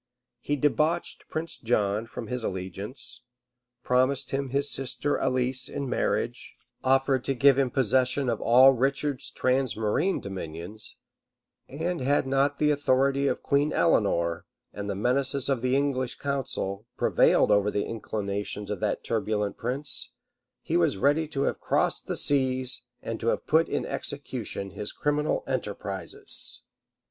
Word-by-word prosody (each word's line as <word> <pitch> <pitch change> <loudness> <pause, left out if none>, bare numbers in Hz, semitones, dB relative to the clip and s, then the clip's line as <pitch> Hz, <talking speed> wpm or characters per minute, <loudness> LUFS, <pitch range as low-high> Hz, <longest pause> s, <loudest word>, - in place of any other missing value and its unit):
He 145 - -1
debauched 150 +4 0
Prince 160 +1 -4
John 110 -2 0
from 120 - -7
his 125 +2 -4
allegiance; 100 +7 -5 0.6
promised 130 +1 +1
him 135 0 -2
his 140 +2 0
sister 135 +2 -1
Alice 130 0 0
in 140 -1 -4
marriage; - - -2 0.3
offered 135 0 +2
to 135 - 0
give 140 +2 +5
him 135 -2 +2
possession 130 +2 +1
of 115 -3 -1
all 130 +3 +7
Richard's 135 +2 -1
transmarine 130 - 0
dominions; 95 +2 -7 0.7
and 165 +3 -3
had 140 +2 +2
not 135 +1 +1
the 150 0 +3
authority 140 -1 +2
of - - -1
Queen 145 +2 +2
Eleanor, 85 - +1 0.3
and 100 0 -5
the 100 - -2
menaces 130 +5 +1
of 135 -4 +1
the 130 +1 +1
English 135 -3 0
council, 120 -7 -3
prevailed - - +4
over 105 0 +4
the 105 0 -1
inclinations 105 -2 -4
of 105 - -3
that - - -1
turbulent 105 -2 -1
prince, 130 +5 -2 0.5
he - - -2
was 85 +3 +2
ready 145 +8 +2
to 140 -2 -2
have - - -1
crossed - - 0
the - - -1
seas, 130 -2 +3 0.2
and 115 - -4
to 115 - -4
have - - 0
put 160 +2 +3
in - - -1
execution 125 -8 -5
his 105 +3 -4
criminal 150 +1 0
enterprises. 100 -7 -1
130 Hz, 140 wpm, -27 LUFS, 105-140 Hz, 0.7 s, all